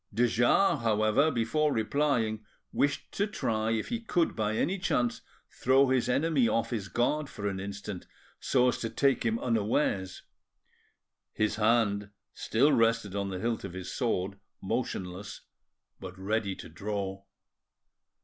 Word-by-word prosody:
De 120 +4 +2
Jars, 125 - +3
however, 110 +6 +3
before 150 +4 +1
replying, 115 -3 0 0.3
wished 145 0 0
to 205 - 0
try 110 - -1
if 115 -1 -1
he 235 - -1
could 175 -7 0
by 110 -1 -1
any 190 +6 0
chance 120 -9 0 0.3
throw 135 +1 +3
his 130 -2 +1
enemy 140 -1 +2
off 115 0 0
his 105 -5 -3
guard 135 +8 0
for 105 -5 -5
an 95 -1 -2
instant, 100 -1 -6 0.3
so 125 -1 +2
as - - -2
to 115 - -3
take 135 +1 +2
him 115 -1 +1
unawares. 105 -5 0 1.1
His 105 -1 0
hand 105 -2 +2 0.2
still 135 +7 +2
rested 115 -3 +2
on 100 -1 -1
the 95 - -4
hilt 115 +4 -2
of 95 -3 -6
his 95 -1 -6
sword, 100 -6 -1 0.2
motionless, 100 -3 -4 0.6
but 95 -1 -9
ready 100 0 -1
to - - -10
draw. 95 +2 -4
115 Hz, 145 wpm, -29 LUFS, 100-130 Hz, 1.1 s, Jars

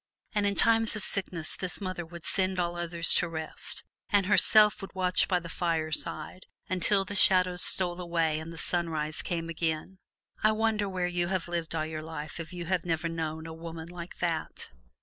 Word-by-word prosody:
And 205 -2 +1
in 200 - 0
times 225 0 +3
of 215 - -3
sickness 175 -5 +3
this 185 -1 -4
mother 185 -3 -4
would 170 0 -11
send 185 -1 -1
all 175 0 -1
others 170 -1 +3
to 175 - +1
rest, 160 -1 -4 0.3
and 205 -3 +3
herself 210 +1 +6
would 195 - -9
watch 185 -1 +2
by 180 -2 +2
the 170 0 -9
bedside 160 0 -1 0.2
until 195 +2 +1
the 205 - -6
shadows 185 -2 +4
stole 180 -1 +2
away 165 -3 0
and 160 +1 -8
the 165 - -9
sunrise 160 -2 -1
came 165 -1 -3
again. 165 +2 -3 0.4
I 215 0 +4
wonder 215 -2 0
where 185 -1 -2
you 175 -1 -1
have 185 -2 -2
lived 170 -1 -3
all 155 -1 -1
your 155 0 -5
life 155 0 -7
if 165 0 -7
you 175 -1 -6
have 180 0 0
never 165 -1 -1
known 160 -1 -4
a 165 - -7
woman 165 0 -8
like 175 0 -9
that? 170 -2 -3
175 Hz, 190 wpm, -29 LUFS, 165-185 Hz, 0.4 s, herself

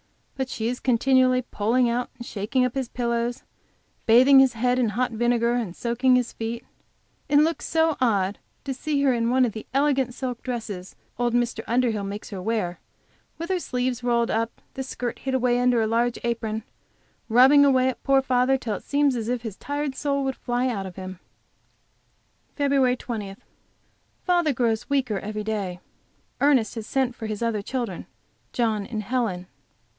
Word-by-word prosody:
But 265 -1 -3
she 220 -2 -3
is 245 +1 -2
continually 255 +1 +3
pulling 235 +3 +1
out 240 +1 -1
and 240 - -8
shaking 235 +6 0
up 250 - -2
his 265 -3 -3
pillows, 235 0 -2 0.6
bathing 260 +4 +7
his 265 -2 +5
head 250 +2 +1
in 240 -3 +2
hot 245 +4 -1
vinegar 235 +1 +1
and 225 -8 -2
soaking 250 +2 +2
his 250 -1 0
feet. 230 +1 -5 0.6
It 290 - +4
looks 320 +3 +2
so 320 -1 +2
odd 200 -5 +1 0.2
to 275 - -3
see 290 +2 -2
her 270 -2 +4
in 230 -1 0
one 255 +1 +4
of 235 - -1
the 220 +1 -8
elegant 270 -3 +2
silk 250 -3 -4
dresses 215 -7 -5 0.2
old 240 -1 +1
Mr. 240 -2 0
Underhill 235 -3 +1
makes 200 +2 -6
her 190 -2 -5
wear, 185 -4 -2 0.6
with 335 +2 -5
her 370 - +1
sleeves 250 -4 -2
rolled 235 -1 +1
up, 230 +1 -2
the 265 - -5
skirt 250 -2 -4
hid 265 -1 -2
away 245 -1 +2
under 245 -1 +3
a 220 - +2
large 235 +2 +1
apron, 225 -2 -2 0.7
rubbing 260 +5 +7
away 260 -2 +4
at 260 - -3
poor 270 -1 +3
father 255 +1 +2
till 230 -5 -3
it - - -6
seems 285 -2 +2
as 230 -1 -3
if 245 -1 -2
his 220 -5 -5
tired 285 +2 -3
soul 280 0 -1
would 265 -1 -1
fly 245 +1 -1
out 200 -6 -2
of 180 - -10
him. 185 -1 -7 1.4
FEB. 275 -3 +2
20. 210 -6 -5 0.9
Father 345 -5 +2
grows 230 -2 0
weaker 255 -8 0
every 210 +1 -5
day. 200 -5 -3 0.6
Ernest 270 -7 +3
has 225 -2 -6
sent 265 -3 0
for 225 -2 -6
his 215 +1 -4
other 225 -3 0
children, 245 +2 -4 0.4
John 220 -4 0
and 215 -3 -4
Helen. 210 -6 -1
245 Hz, 180 wpm, -25 LUFS, 225-260 Hz, 1.4 s, bathing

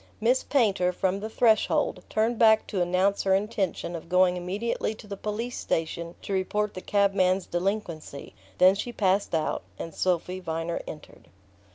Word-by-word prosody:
Miss 245 +4 +3
Painter, 200 -9 +2
from 190 +2 -1
the 215 +2 -5
threshold, 220 -1 +2
turned 225 +2 0
back 220 -1 +5
to 190 - -2
announce 185 +3 +2
her 190 -1 +3
intention 195 -4 -2
of 165 0 -8
going 180 0 +4
immediately 200 +5 -2
to 215 - -13
the 200 -1 -6
police 215 +5 -4
station 170 +1 -2
to 200 - -4
report 205 +2 -1
the 185 - -7
cabman's 195 -2 +2
delinquency; 175 - -3 0.2
then 185 +1 +7
she 205 +5 -4
passed 195 -4 +1
out, 155 - -1 0.2
and 165 - -6
Sophy 180 +1 -1
Viner 165 -1 -3
entered. 150 - -11
190 Hz, 160 wpm, -27 LUFS, 180-210 Hz, 0.2 s, then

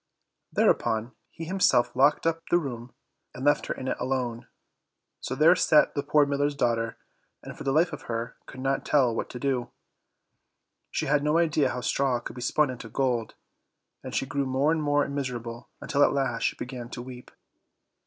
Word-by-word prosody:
Thereupon 110 +2 +1 0.2
he 165 - -8
himself 180 -8 +2
locked 145 +4 +3
up 165 0 +1
the 175 - +5
room, 125 -6 -5 0.4
and 130 +2 -5
left 145 0 +3
her - - -1
in 130 - -6
it - - -1
alone. 125 -3 -2 0.7
So 130 - -4
there 160 +5 +6
sat 155 -4 +4
the 140 - -1
poor 145 +1 +3
miller's 145 +1 0
daughter, 115 -3 0 0.5
and - - -8
for - - -8
the 135 - 0
life 160 +5 +2
of - - -6
her 115 0 -3
could 130 - -9
not 135 +1 0
tell 130 -6 +3
what 115 - -3
to 125 - -7
do; 130 -3 -1 1.2
she - - -2
had 145 +1 +2
no 150 +2 +2
idea 155 -3 +2
how 125 - -4
straw 130 -1 +1
could 120 - -8
be 125 - -7
spun 140 +3 +2
into 115 -2 -8
gold, 120 -2 -1 0.7
and - - -6
she - - 0
grew 140 0 -2
more 135 +4 +2
and 165 -1 0
more 145 -1 +2
miserable, 120 -4 -5
until 145 0 +2
at - - +4
last 130 -4 0
she - - +1
began 125 -1 -7
to 120 - -6
weep. 125 -1 -10
135 Hz, 190 wpm, -27 LUFS, 120-145 Hz, 1.2 s, there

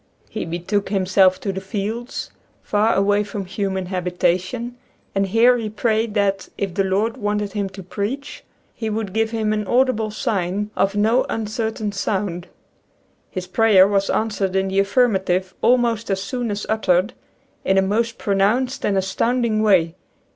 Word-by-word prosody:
He 220 - -3
betook 175 +5 -2
himself 190 -1 +3
to 200 - -1
the 190 - -4
fields, 215 +5 -4 0.3
far 215 +2 +2
away 205 +1 +3
from 200 -1 -5
human 190 0 -2
habitation, 185 +6 -1 0.4
and 195 0 +1
here 235 +5 +5
he 220 -2 -3
prayed, 220 0 0
that, 195 -2 0
if 195 -3 -2
the 195 - +1
Lord 200 +4 0
wanted 205 -1 -2
him 200 -2 -2
to 190 0 -10
preach 235 +10 -5 0.3
He 225 -2 -4
would 210 -3 -3
give 225 +1 +1
him 220 -1 0
an 210 -2 -2
audible 245 -3 +2
sign 205 -1 -2
of 195 +1 +1
no 220 +5 +3
uncertain 220 -1 -2
sound. 190 -3 -2 0.8
His 185 -1 -5
prayer 195 0 +5
was 200 -1 +1
an 225 - +1
swered 195 -3 -2
in 190 0 +1
the 190 +1 +1
affirmative 190 -4 +1
almost 235 -3 +2
as 195 -1 0
soon 235 +4 -3
as 205 0 -3
uttered, 205 -1 +1 0.5
in 190 - +2
a 190 - +5
most 230 +4 0
pronounced 215 +7 +1
and 195 - +1
astounding 220 +4 +1
way. 185 -6 +3
205 Hz, 160 wpm, -21 LUFS, 190-225 Hz, 0.8 s, here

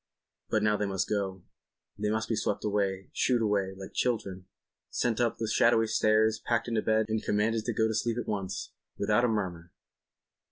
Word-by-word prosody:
But 110 - +1
now 105 -1 +3
they 105 - -1
must 95 -1 -1
go. 95 -3 -2 0.5
They 105 0 -2
must 110 +1 -1
be 115 - 0
swept 105 - -1
away, 100 -2 -1
shooed 120 -3 +2
away—like 95 -2 -1
children, 100 -7 -1 0.4
sent 120 -1 0
up 120 -1 +1
the 115 - -2
shadowy 115 +1 +4
stairs, 110 0 +3
packed 115 0 0
into 115 -2 0
bed 110 0 +2
and 110 0 -1
commanded 110 +1 0
to 120 - -1
go 110 +1 +2
to 110 - -1
sleep—at 120 +2 -1
once—without 100 +2 -2
a - - +3
murmur! 90 -6 -3
110 Hz, 170 wpm, -29 LUFS, 100-115 Hz, 0.5 s, shadowy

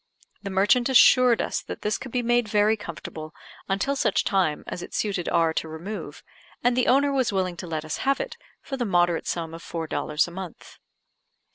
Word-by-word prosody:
The 200 - -5
merchant 205 +7 +3
assured 250 -2 +6
is - - -2
that - - -7
this 210 0 0
could 260 - -8
be 245 0 -1
made 240 -1 +2
very 210 +1 +3
comfortable 155 -4 -8 0.3
until 200 +9 0
such - - +1
time 180 -7 +1
as 175 - -6
it - - -8
suited 195 -5 -1
R 165 -1 +2
to 160 - -2
remove, 160 -1 -7 0.4
and 245 0 +3
the 250 - +1
owner 280 +2 +4
was 260 -4 +1
willing 185 -2 -1
to 180 - -7
let 160 -1 -3
us 155 - -3
have 275 0 +1
it - - -4 0.3
for 270 - -5
the 245 - -1
moderate 175 -4 +1
sum 165 -2 -3
of 165 - -8
four 165 -1 -5
dollars 150 0 0
a - - -9
month. 185 -1 -9
195 Hz, 205 wpm, -25 LUFS, 165-240 Hz, 0.4 s, assured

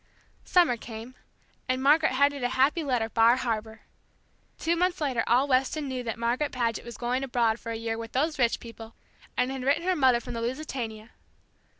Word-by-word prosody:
Summer 340 -10 +3
came, 225 +2 -9 0.6
and 255 +1 0
Margaret 305 +1 +4
headed 280 +1 +2
a 245 - +1
happy 275 +6 +2
letter 250 -6 0
"Bar 230 +1 +4
Harbor." 225 -3 -3 0.8
Two 335 +1 0
months 360 +1 0
later 270 -6 0
all 250 +4 +3
Weston 270 +3 +1
knew 260 -1 -3
that 230 -2 -4
Margaret 240 +5 0
Paget 235 -3 -1
was 235 0 -9
going 250 +2 -1
abroad 235 -3 +1
for 230 - -6
a - - -3
year 225 0 -3
with 230 0 -8
those 300 +2 0
rich 235 -2 +2
people, 230 -1 -11 0.4
and 250 +1 +1
had 265 -1 -5
written 285 +5 +2
her 370 +1 +1
mother 260 -6 +4
from 240 - -8
the 230 - -4
Lusitania. 235 -4 -5
250 Hz, 190 wpm, -27 LUFS, 230-280 Hz, 0.8 s, Margaret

